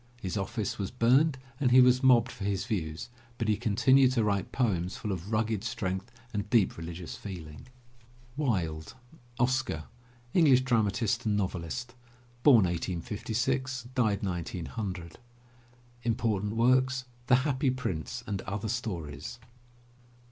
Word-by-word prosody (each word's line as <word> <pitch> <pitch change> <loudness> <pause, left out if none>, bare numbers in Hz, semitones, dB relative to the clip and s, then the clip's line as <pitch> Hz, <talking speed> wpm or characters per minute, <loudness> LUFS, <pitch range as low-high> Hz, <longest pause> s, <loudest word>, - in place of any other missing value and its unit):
His 95 -5 -4
office 100 +2 -3
was 100 -1 -2
burned 130 +5 +3 0.2
and 135 -4 +3
he 125 +1 +7
was 125 0 +6
mobbed 125 -2 +5
for - - -8
his 100 -1 -1
views, 80 -3 -3 0.3
but 115 - -2
he 105 - +3
continued 125 +4 +4
to 115 -3 +2
write 100 -3 0
poems 95 -8 0
full 105 - -4
of 95 +2 -5
rugged 110 -2 0
strength 105 -3 -3 0.2
and 105 -1 -3
deep 110 -5 +3
religious 85 +1 -7
feeling. 80 -7 -9 0.7
WILDE, 90 - -1 0.4
OSCAR 125 -10 +1 0.5
(English 140 -7 +6
dramatist 115 -1 +1
and 105 -1 +2
novelist, 95 +5 -3 0.5
1856 115 - +1
1900) 95 -4 -2 0.8
Important 110 -3 0
Works: 130 +2 +3 0.2
The 125 - +6
Happy 140 -1 +1
Prince 95 - -3
and 100 -2 -3
Other 100 +3 -4
Stories. 85 - -4
110 Hz, 120 wpm, -29 LUFS, 95-125 Hz, 0.8 s, he